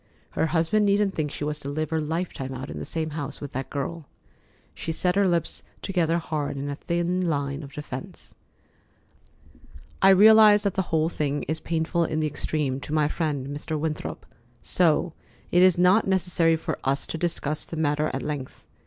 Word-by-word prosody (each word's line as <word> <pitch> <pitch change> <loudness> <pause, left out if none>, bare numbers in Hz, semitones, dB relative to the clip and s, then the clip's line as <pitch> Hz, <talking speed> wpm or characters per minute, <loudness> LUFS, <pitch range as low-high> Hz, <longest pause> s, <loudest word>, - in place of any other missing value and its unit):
Her 160 - 0
husband 175 +6 +2
needn't 200 0 +2
think 155 -3 -2
she 145 - -6
was 150 0 -2
to 140 - -6
live 155 +2 -3
her 160 -1 +1
lifetime 150 -4 -3
out 130 +2 -6
in - - -6
the - - -5
same 160 -1 -3
house 145 -2 -4
with 145 -1 -7
that 130 0 -4
girl. 150 +2 -4 0.7
She 165 - -4
set 180 +2 0
her 200 0 +3
lips 170 -2 -1 0.2
together 170 -4 +1
hard 155 -4 -3
in 140 +1 -3
a - - -3
thin 175 +3 -1
line 140 -1 -2
of 140 -2 -10
defence. 140 -3 -8 1.7
"I 195 - +7
realize 210 +1 +7
that 200 -3 0
the 190 - +1
whole 160 -1 +2
thing 145 -3 -2
is 155 +1 -2
painful 165 +1 0
in 155 -1 -1
the 155 - +1
extreme 145 -2 -2
to 145 - -9
my 150 -1 +3
friend, 145 -4 -2
Mr. 150 +1 -3
Winthrop, 155 -1 -4 0.4
so 170 -1 +2 0.4
it 175 - +5
is 185 -2 +6
not 185 +5 +4
necessary 180 -3 +3
for 160 - -4
us 135 +1 0
to 160 - -5
discuss 155 -3 -1
the 165 - -7
matter 150 0 +1
at 130 -1 -4
length. 145 -3 -5
160 Hz, 190 wpm, -25 LUFS, 145-175 Hz, 1.7 s, I